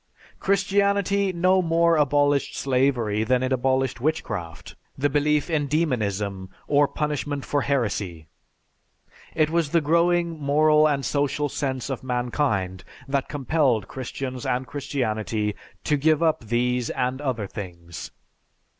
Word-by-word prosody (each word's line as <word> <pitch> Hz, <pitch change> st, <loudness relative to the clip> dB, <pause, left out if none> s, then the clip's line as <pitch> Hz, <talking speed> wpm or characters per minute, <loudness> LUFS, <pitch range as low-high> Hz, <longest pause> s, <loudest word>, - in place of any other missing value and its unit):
Christianity 200 Hz, 0 st, +2 dB
no 185 Hz, +2 st, +3 dB
more 170 Hz, 0 st, +3 dB
abolished 145 Hz, -1 st, +2 dB
slavery 125 Hz, -5 st, +1 dB
than 125 Hz, +2 st, +1 dB
it 130 Hz, +1 st, 0 dB
abolished 130 Hz, -1 st, 0 dB
witchcraft, 105 Hz, -, -3 dB, 0.2 s
the 145 Hz, +1 st, +1 dB
belief 150 Hz, 0 st, +2 dB
in 155 Hz, -4 st, 0 dB
demonism, 105 Hz, -, -1 dB, 0.2 s
or 145 Hz, 0 st, +4 dB
punishment 145 Hz, -1 st, -3 dB
for 145 Hz, -, 0 dB
heresy. 105 Hz, -, -1 dB, 1.1 s
It 155 Hz, -1 st, +2 dB
was 165 Hz, -3 st, +1 dB
the 170 Hz, -, +3 dB
growing 170 Hz, +1 st, +2 dB
moral 150 Hz, +2 st, +4 dB
and 140 Hz, -2 st, 0 dB
social 145 Hz, 0 st, 0 dB
sense 135 Hz, -1 st, -3 dB
of 130 Hz, -, -4 dB
mankind 120 Hz, -7 st, -1 dB, 0.2 s
that 135 Hz, 0 st, -1 dB
compelled 135 Hz, -7 st, +1 dB
Christians 130 Hz, 0 st, -5 dB
and 125 Hz, +1 st, -1 dB
Christianity 110 Hz, -6 st, -2 dB, 0.3 s
to 150 Hz, -, +1 dB
give 155 Hz, +2 st, +2 dB
up 160 Hz, -7 st, +1 dB
these 120 Hz, +1 st, 0 dB
and 130 Hz, +2 st, -2 dB
other 125 Hz, -7 st, -2 dB
things." 85 Hz, -4 st, -8 dB
140 Hz, 125 wpm, -24 LUFS, 120-155 Hz, 1.1 s, or